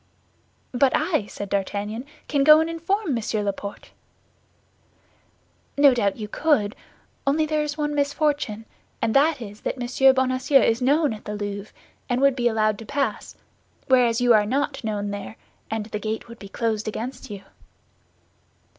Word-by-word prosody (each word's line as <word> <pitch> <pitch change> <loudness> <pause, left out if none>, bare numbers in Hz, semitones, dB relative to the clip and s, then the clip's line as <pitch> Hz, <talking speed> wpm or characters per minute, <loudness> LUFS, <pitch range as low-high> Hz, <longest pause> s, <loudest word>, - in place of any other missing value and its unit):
"But 260 +1 +3
I," 310 - 0
said 205 -1 -7
D'Artagnan, 205 +4 -2 0.2
"can 285 -2 +1
go 305 +2 +8
and 320 - +1
inform 335 +1 -1
Monsieur 220 -2 -1
Laporte." 200 0 -5 1.9
"No 285 -2 +7
doubt 200 -5 0
you 215 -2 -5
could, 225 -4 +1 0.5
only 310 +3 +3
there 305 0 0
is 300 0 -3
one 295 -1 -1
misfortune, 285 -6 -1 0.3
and 225 - 0
that 290 +1 +3
is 205 0 -11
that - - -3
Monsieur 255 +2 +4
Bonacieux 260 +1 +3
is 225 +2 +1
known 290 +1 +2
at 215 - -11
the 210 - -4
Louvre, 205 0 -5 0.4
and 245 0 +1
would 275 -1 +4
be 240 -2 +1
allowed 215 -2 +1
to 225 - -9
pass; 280 -1 -2 0.5
whereas 245 -3 +4
you 245 -1 +5
are 210 -1 +4
not 270 +2 -1
known 205 -2 -2
there, 205 +2 -6 0.3
and 220 -1 -3
the 210 -1 -5
gate 220 +1 -4
would 235 0 -12
be 200 - -10
closed 220 -1 -2
against 245 +4 -5
you." 200 -2 -8
245 Hz, 160 wpm, -24 LUFS, 210-285 Hz, 1.9 s, go